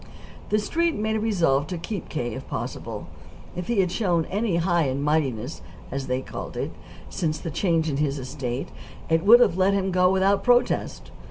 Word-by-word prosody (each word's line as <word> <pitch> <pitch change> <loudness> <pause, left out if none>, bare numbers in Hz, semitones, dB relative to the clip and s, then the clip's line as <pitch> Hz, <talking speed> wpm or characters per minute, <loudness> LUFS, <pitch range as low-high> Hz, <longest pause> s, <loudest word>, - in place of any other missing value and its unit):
The 210 - +3
Street 330 +9 0
made 220 +1 -1
a - - -1
resolve 165 -10 +2
to 180 - -4
keep 190 +3 -5
K., 120 -6 -3
if - - -7
possible. - - -5 0.5
If 180 0 -4
he 235 -4 +3
had 180 -2 0
shown 175 -5 +1
any 205 -1 0
"high 170 -1 +2
and 135 +1 -1
mightiness," 145 -4 -1 0.3
as 135 0 -3
they 130 +1 -1
called - - -7
it, - - -2 0.4
since 160 -5 -2
the 165 - -5
change 165 -2 +1
in 140 -3 -1
his 145 -1 0
estate, 130 -1 -4 0.4
it 165 0 +2
would 230 +4 +8
have 195 -7 +3
let 195 +1 +4
him 190 -1 0
go 180 0 +4
without 190 +1 +2
protest. 245 0 +1
170 Hz, 190 wpm, -25 LUFS, 145-200 Hz, 0.5 s, would